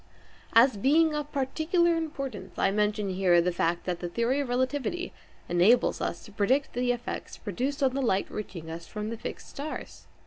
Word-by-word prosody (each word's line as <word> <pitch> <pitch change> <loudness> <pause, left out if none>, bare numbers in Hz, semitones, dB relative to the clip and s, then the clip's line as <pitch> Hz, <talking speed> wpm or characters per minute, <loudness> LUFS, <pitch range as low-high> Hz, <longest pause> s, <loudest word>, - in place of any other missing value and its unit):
As 230 0 +6
being 305 +8 +4
of 295 -1 -3
particular 325 +5 +1
importance, 275 - -5
I 195 - +3
mention 210 -1 0
here 180 -2 +4
the 180 +1 +2
fact 170 0 0
that 180 -2 -2
the 175 - -4
theory 235 +8 +1
of 280 -3 -2
relativity 260 +7 -1 0.3
enables 185 +8 +4
us - - -3
to 210 - -13
predict 250 +8 +1
the 245 0 +1
effects 245 0 -5
produced 260 +8 -2
on 260 -1 +3
the 275 - -1
light 200 -6 +2
reaching 170 -6 -6
us 165 +1 -7
from 210 +1 -4
the 230 - -4
fixed - - -7
stars. 295 +2 -7
240 Hz, 180 wpm, -28 LUFS, 195-280 Hz, 0.3 s, As